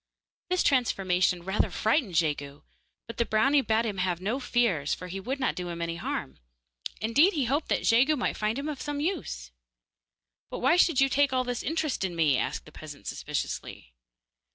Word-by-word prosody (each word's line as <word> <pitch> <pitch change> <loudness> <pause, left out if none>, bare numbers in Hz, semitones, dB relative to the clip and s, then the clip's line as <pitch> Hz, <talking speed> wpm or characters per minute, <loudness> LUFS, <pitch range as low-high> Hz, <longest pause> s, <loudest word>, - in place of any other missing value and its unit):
This 365 0 +2
transformation 185 -9 +2
rather 190 +3 0
frightened 220 - 0
Jegu, 145 -3 -1 0.4
but 230 - -9
the 235 - +3
brownie 270 +7 +3
bade 225 -2 +1
him 205 -4 -3
have 180 -2 0
no 215 +8 -2
fears, 230 - +1
for 180 - -9
he 195 +2 -5
would 260 +8 -4
not 260 - +1
do 180 -1 -5
him 170 0 -5
any 170 0 -3
harm; - - -4 0.6
indeed, 285 - +4
he 285 -5 0
hoped 285 +6 0
that - - +1
Jegu 260 +7 +4
might 250 - -1
find 215 +3 -1
him 280 +2 -3
of 300 -3 -4
some 290 -1 -3
use. 290 - -3 1.0
'But - - -5
why 265 +6 +3
should 335 -5 +4
you 270 - +5
take 280 +1 +2
all 255 0 +2
this 245 -1 -3
interest 315 -7 -1
in 180 -2 -2
me?' 150 -6 +3
asked - - -3
the - - -14
peasant - - -11
suspiciously. - - -5
230 Hz, 190 wpm, -28 LUFS, 180-275 Hz, 1.0 s, you